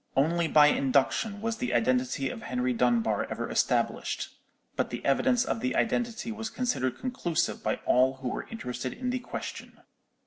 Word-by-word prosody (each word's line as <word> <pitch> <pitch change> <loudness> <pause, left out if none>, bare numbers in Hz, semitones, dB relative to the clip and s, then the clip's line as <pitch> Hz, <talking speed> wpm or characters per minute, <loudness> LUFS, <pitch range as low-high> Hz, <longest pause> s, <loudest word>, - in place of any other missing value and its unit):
Only 165 +5 +2
by 150 -1 +7
induction 150 - +2
was 225 0 -2
the 125 - -1
identity 125 +2 +1
of 115 - -8
Henry 125 0 -1
Dunbar 115 -3 +1
ever - - -3
established: - - 0 0.5
but - - 0
the - - -6
evidence 245 - +3
of - - -1
the 255 +3 -1
identity 230 0 0
was 225 0 -4
considered 220 - -1
conclusive 245 -10 -1
by - - 0
all 130 +1 +4
who 130 -1 -4
were - - -4
interested 125 - -4
in 250 +1 -3
the 255 - -1
question. 245 - -7
150 Hz, 165 wpm, -28 LUFS, -, 0.5 s, by